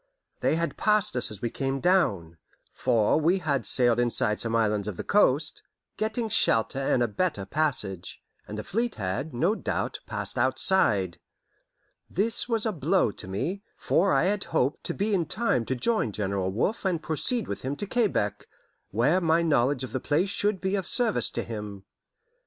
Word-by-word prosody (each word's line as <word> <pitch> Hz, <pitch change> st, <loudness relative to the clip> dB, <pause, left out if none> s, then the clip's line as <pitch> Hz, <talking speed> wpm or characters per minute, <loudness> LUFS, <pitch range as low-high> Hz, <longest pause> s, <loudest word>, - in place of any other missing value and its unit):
They -, -, +1 dB
had 165 Hz, -3 st, -2 dB
passed 210 Hz, -, +2 dB
us 125 Hz, -, +2 dB
as 105 Hz, -1 st, -8 dB
we 120 Hz, -, -1 dB
came 135 Hz, 0 st, -2 dB
down, 100 Hz, -, +1 dB, 0.3 s
for 115 Hz, +5 st, +2 dB
we 170 Hz, +5 st, +3 dB
had 145 Hz, -, -1 dB
sailed 120 Hz, -2 st, +3 dB
inside 115 Hz, -3 st, +1 dB
some 115 Hz, -1 st, 0 dB
islands 105 Hz, -2 st, +1 dB
of 100 Hz, -5 st, -5 dB
the -, -, -4 dB
coast, 160 Hz, -6 st, +2 dB, 0.3 s
getting 220 Hz, +2 st, -2 dB
shelter 115 Hz, -, +3 dB
and 120 Hz, -5 st, 0 dB
better 170 Hz, -, 0 dB
passage, 100 Hz, -, -1 dB, 0.3 s
and 105 Hz, -, -7 dB
the 105 Hz, -, -4 dB
fleet 230 Hz, -, -2 dB
had, 110 Hz, +9 st, -3 dB
no 160 Hz, -, +1 dB
doubt, -, -, -3 dB
passed 105 Hz, +2 st, -2 dB
outside. 120 Hz, -, +2 dB, 0.9 s
This 220 Hz, +6 st, +2 dB
was 225 Hz, -2 st, 0 dB
a 220 Hz, -, +1 dB
blow 170 Hz, -, +1 dB
to 95 Hz, -, -8 dB
me, 165 Hz, -, -3 dB, 0.2 s
for 195 Hz, +4 st, +1 dB
I -, -, +3 dB
had 200 Hz, +2 st, 0 dB
hoped 135 Hz, +4 st, -1 dB
to -, -, -3 dB
be 210 Hz, +2 st, -1 dB
in 175 Hz, -5 st, +1 dB
time 185 Hz, -, 0 dB
to 130 Hz, -, -2 dB
join 215 Hz, -, 0 dB
General 100 Hz, -2 st, -2 dB
Wolfe 125 Hz, -, -1 dB
and 185 Hz, -4 st, 0 dB
proceed 160 Hz, -, -1 dB
with -, -, -5 dB
him 135 Hz, +2 st, -3 dB
to 205 Hz, -, -3 dB
Quebec, 190 Hz, -, -1 dB, 0.4 s
where 135 Hz, -, +2 dB
my 165 Hz, 0 st, +2 dB
knowledge 140 Hz, -4 st, +2 dB
of 130 Hz, -, -6 dB
the 130 Hz, -, -2 dB
place 165 Hz, +9 st, 0 dB
should 205 Hz, -1 st, +1 dB
be 190 Hz, +1 st, -2 dB
of 195 Hz, -2 st, -1 dB
service 240 Hz, -4 st, +1 dB
to -, -, -3 dB
him. 105 Hz, -3 st, -7 dB
140 Hz, 180 wpm, -26 LUFS, -, 0.9 s, we